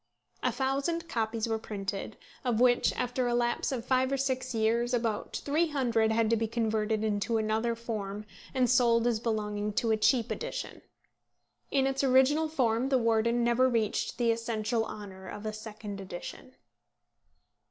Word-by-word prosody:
A - - +1
thousand 280 +6 -1
copies 225 -4 -1
were 225 -1 -1
printed, 200 0 -5 0.3
of 240 -4 0
which, 245 -1 +4
after 250 0 -1
a 240 - +1
lapse 240 +2 0
of 245 -3 -3
five 260 0 +2
or 275 - +1
six 260 -1 -1
years, 235 +3 +2
about 225 -3 -2
300 275 -8 +1
had 225 0 +2
to - - +5
be 225 0 0
converted 220 -1 0
into 215 +2 0
another 220 +2 0
form, 210 -3 -5 0.3
and 255 -2 +2
sold 235 -2 +4
as 235 -2 +2
belonging 210 -2 -2
to 225 +2 +1
a 220 - +3
cheap 230 +1 +2
edition. - - -5 0.9
In 270 -1 +2
its 270 0 0
original 270 +4 +4
form 255 -4 +1
The 265 - +4
Warden 230 0 +2
never 240 +2 +3
reached 225 -4 -1
the 235 -2 +3
essential 230 0 -1
honour 190 -3 -9
of 205 +3 -7
a 215 - -2
second 210 -2 -7
edition. 190 +7 -8
230 Hz, 160 wpm, -30 LUFS, 220-255 Hz, 0.9 s, to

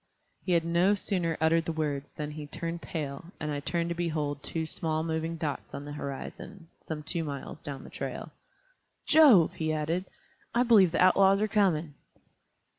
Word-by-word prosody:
He 185 - 0
had 165 -1 +2
no 175 +4 +3
sooner 180 -5 -1
uttered 165 +1 +3
the - - -1
words 150 -3 -3
than 150 0 -5
he 150 -1 -7
turned 165 +3 -5
pale, 145 -4 -5
and 150 -1 -3
I 145 - -2
turned 170 +3 -1
to - - 0
behold 155 -4 -2
two 160 +2 -3
small 160 0 0
moving 160 0 -2
dots 150 -3 -4
on 140 - -6
the 145 - -7
horizon, 155 +5 -7
some 155 -2 -6
two 165 +2 -2
miles 145 0 -6
down 140 -2 -6
the - - -12
trail. - - -5 0.7
"Jove!" 275 - +7
he 155 -1 -2
added, 160 +4 -1 0.5
"I 245 - +4
believe 210 -8 +6
the 175 - +3
outlaws 195 +1 +5
are 215 - +1
coming." 175 -8 +1
165 Hz, 180 wpm, -29 LUFS, 150-175 Hz, 0.7 s, Jove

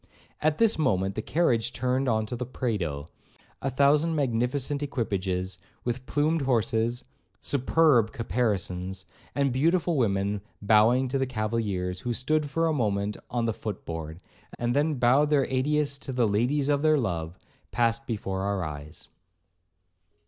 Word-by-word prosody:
At 155 0 +2
this 225 -6 +3
moment 95 -9 +1
the 110 - -3
carriage 120 -6 +1
turned 130 +2 0
into 110 0 0
the 125 - -3
Prado; 85 - -2 0.5
a 135 - -1
thousand 145 +5 +3
magnificent 135 +1 0
equipages, 95 -9 -2 0.2
with 125 +1 -3
plumed 155 +2 +1
horses, 120 -1 0 0.3
superb 140 -4 +3
caparisons, 95 -5 -2 0.3
and 140 -3 +1
beautiful 165 +4 +2
women 100 -3 0 0.2
bowing 110 +5 +4
to 135 +1 0
the 135 - 0
cavaliers, 105 -6 -2
who 120 +4 -2
stood 150 +4 0
for 165 +4 0
a 160 - +2
moment 105 -5 0
on 120 -1 -1
the 115 - 0
foot 105 -3 -6
board, 80 -1 -5 0.4
and 120 +1 -1
then 150 +2 +2
bowed 130 +4 +4
their 145 -3 +3
adieus 140 +2 0
to 140 - -6
the 125 -3 +2
'ladies 125 +8 +1
of 145 -1 +2
their 155 0 +4
love,' 85 - -2 0.3
passed 120 +2 0
before 95 -4 -3
our 100 -2 -1
eyes. 75 +1 -8
120 Hz, 145 wpm, -27 LUFS, 100-140 Hz, 0.5 s, bowing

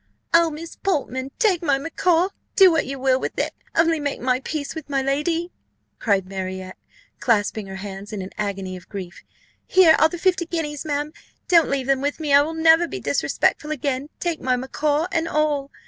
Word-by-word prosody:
"Oh, 335 0 +5
Miss 320 +2 -8
Portman, 270 -8 -2
take 415 -8 +2
my 285 -5 +2
macaw 335 +4 +1 0.3
do 380 -2 +8
what 320 -4 +1
you 275 +1 -4
will 260 0 +2
with - - -4
it - - -1 0.2
only 325 -1 +3
make 285 -1 -3
my 255 0 +1
peace 285 +1 -4
with 315 -3 -8
my 275 -1 +1
lady," 325 +6 -1 0.5
cried 200 -4 +1
Marriott, 190 0 -6 0.4
clasping 215 -3 +1
her 190 - -7
hands, 195 +1 -7
in 205 -3 -4
an 185 - -8
agony 195 -3 -3
of 180 - -12
grief: 185 -4 -7 0.5
"here 355 -4 +6
are 315 - +5
the 350 - -6
fifty 355 -1 +1
guineas, 315 -3 -3
ma'am, 295 0 -2 0.3
don't 335 -4 +5
leave 275 -2 -1
them 270 0 +1
with 285 +3 -2
me 300 -3 -1
I 280 - +8
will 320 +3 -3
never 325 +1 +5
be - - -6
disrespectful 300 - 0
again 280 -1 -2
take 340 -3 -2
my 255 0 +1
macaw 290 +4 0
and 330 -1 0
all! 300 -3 0
290 Hz, 195 wpm, -22 LUFS, 255-325 Hz, 0.5 s, do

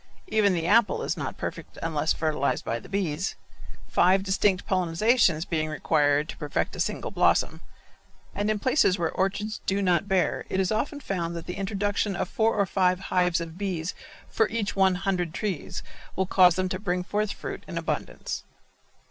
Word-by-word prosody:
Even 205 - +3
the 165 -1 -1
apple 215 +4 +3
is - - -1
not - - -5
perfect - - -6
unless 160 -1 0
fertilized 150 -5 0
by 115 - -1
the - - -14
bees, 185 -3 -1 0.5
five 190 +2 +4
distinct 195 -1 +1
pollenizations 180 -1 +2
being 155 -2 -1
required 150 -1 +2
to - - -8
perfect 150 -2 -2
a - - -8
single - - -2
blossom, - - +2 0.7
and 205 +1 -1
in 215 - +1
places 210 -4 +3
where 165 -2 0
orchards 205 +3 -2
do 195 +1 +1
not 185 0 +2
bear 190 -2 +1
it 190 - -1
is 190 0 +1
often 280 +7 -1
found 170 -8 -3
that 170 - -6
the 180 - -4
introduction 205 +1 -1
of - - -1
four 225 +3 +1
or 200 -2 +2
five 185 -1 +2
hives 180 -2 +3
of 165 +1 -7
bees 180 -4 -2 0.3
for 220 - +1
each 220 -2 -2
one 190 -1 +4
hundred 180 -3 -1
trees 190 -3 -3 0.3
will 190 - +1
cause 180 -2 +5
them 185 0 0
to 185 0 -3
bring 180 -3 -1
forth 210 +2 -1
fruit - - -6
in - - -5
abundance. - - -3
185 Hz, 180 wpm, -26 LUFS, 170-200 Hz, 0.7 s, cause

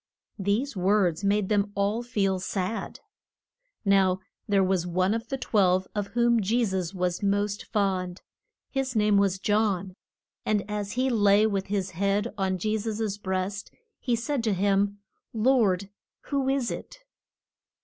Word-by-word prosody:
These 210 +7 0
words 185 -2 +2
made 200 0 +1
them 205 -1 +1
all 200 +3 0
feel 200 -6 0
sad. 190 +3 -3 0.8
Now 190 -2 +4 0.3
there 200 -2 +3
was 185 -2 +1
one 185 +3 +1
of 230 +1 -3
the 270 - -3
twelve 190 -7 +2
of 205 -1 -2
whom 235 0 +2
Je 230 +5 +2
sus 190 -4 -2
was 180 -1 -1
most 205 0 0
fond. 185 -3 -1 0.5
His 270 -2 -2
name 210 -1 +3
was 195 -2 +2
John. 200 -2 0 0.5
And 210 -2 0
as 210 -1 -3
he 255 +1 +1
lay 205 -2 +4
with 200 -3 -1
his 195 -2 -2
head 200 +5 0
on 190 -2 0
Je 215 +4 -1
sus' 215 -1 -3
breast 190 +1 -3 0.3
he 245 -2 0
said 250 +2 -2
to 215 - +2
him, 200 +1 +1 0.4
Lord, 215 -5 +2 0.4
who 275 -2 0
is 270 -3 0
it? - - -7
200 Hz, 150 wpm, -27 LUFS, 190-220 Hz, 0.8 s, Now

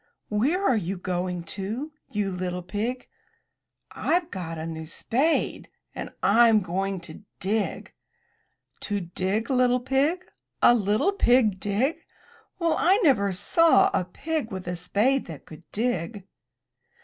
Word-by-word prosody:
"Where 290 - +1
are 255 - +4
you 190 -1 -3
going 180 -1 -3
to, 220 +10 -4 0.2
you 205 -2 -1
little 180 0 -4
pig?'* 225 +7 -3 0.9
"Fve 350 0 0
got 165 -3 -5
a 160 - -5
new 160 -1 -6
spade, 265 - 0 0.2
and - - -6
Fm 220 0 +5
going 190 +2 -2
to 170 +2 -11 0.2
dig.*' 205 +3 -2 0.9
"To 205 -1 -2
dig, 190 +7 -2
little 250 -1 +3
pig? 270 +8 +1 0.4
A - - +6
little 215 - +2
pig 240 - +3
dig! 215 +11 -1 0.5
Well, 335 -3 +1
I 375 +4 +4
never 205 - +3
saw 315 - +4
a - - +1
pig 290 - -4
with 185 -2 -6
a 180 - -2
spade 210 +10 +1
that 160 -5 -9
could 160 +2 -14
dig!'' 205 -3 -2
210 Hz, 135 wpm, -26 LUFS, 185-260 Hz, 0.9 s, A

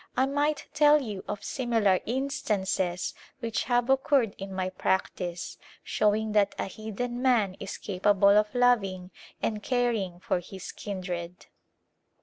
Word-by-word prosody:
I 260 - +4
might 290 +2 0
tell 300 0 +6
you 210 -8 -5
of 205 - -4
similar 225 -7 +2
instances 210 -8 -1 0.3
which 230 -4 -2
have 245 -1 +2
occurred 265 -4 +3
in 195 0 -6
my 185 -1 -2
practice, 180 -2 -2 0.2
showing 215 +1 +1
that 210 -1 +2
a - - -1
heathen 220 +4 -5
man 230 -8 +3
is - - -5
capable 200 0 +3
of 210 +1 +2
loving 195 -7 +2 0.3
and 215 -2 -1
caring 225 -8 0
for 180 - 0
his 190 +1 -8
kindred. 180 -3 -5
210 Hz, 135 wpm, -28 LUFS, 190-245 Hz, 0.3 s, tell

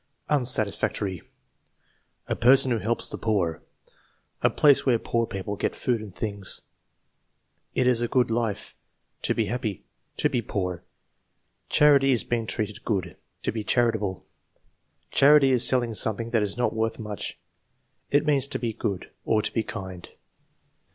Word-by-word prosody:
Unsatisfactory. 105 - +3 1.1
"A - - -1
person 130 +2 +5
who 115 - +1
helps 115 +4 -1
the - - -6
poor." 95 -7 -1 0.8
"A - - +4
place 145 -2 +4
where 125 -4 +3
poor 115 0 -1
people 100 +1 -5
get - - -2
food 120 -3 -1
and 105 -4 -10
things." 100 -3 -2 1.1
"It 130 - +2
is 125 -2 +4
a 120 - 0
good 125 -1 +1
life." 115 -3 -3 0.5
"To - - 0
be 115 - 0
happy." 110 -4 -4 0.3
"To - - +2
be 130 -5 -1
poor." 90 -5 -4 0.9
"Charity 140 -2 +5
is 120 - +3
being 115 -2 -2
treated 105 +1 -3
good." 100 -5 -1
"It - - -10
is - - -38
to - - 0
be 110 -1 -4
charitable." 110 -5 0 0.9
"Charity 140 -1 +5
is 125 -2 +5
selling 120 -3 +2
something 110 +2 -1
that 115 -3 +2
is 105 +1 -1
not 125 - 0
worth 110 0 -1
much." 105 -2 -6 0.7
"It 145 +1 +2
means 140 -3 +2
to - - -2
be 115 -2 -3
good" 100 -3 -4
or 110 -1 +1
"to 105 - -1
be 115 - +1
kind." 95 -5 -8
115 Hz, 160 wpm, -25 LUFS, 105-125 Hz, 1.1 s, person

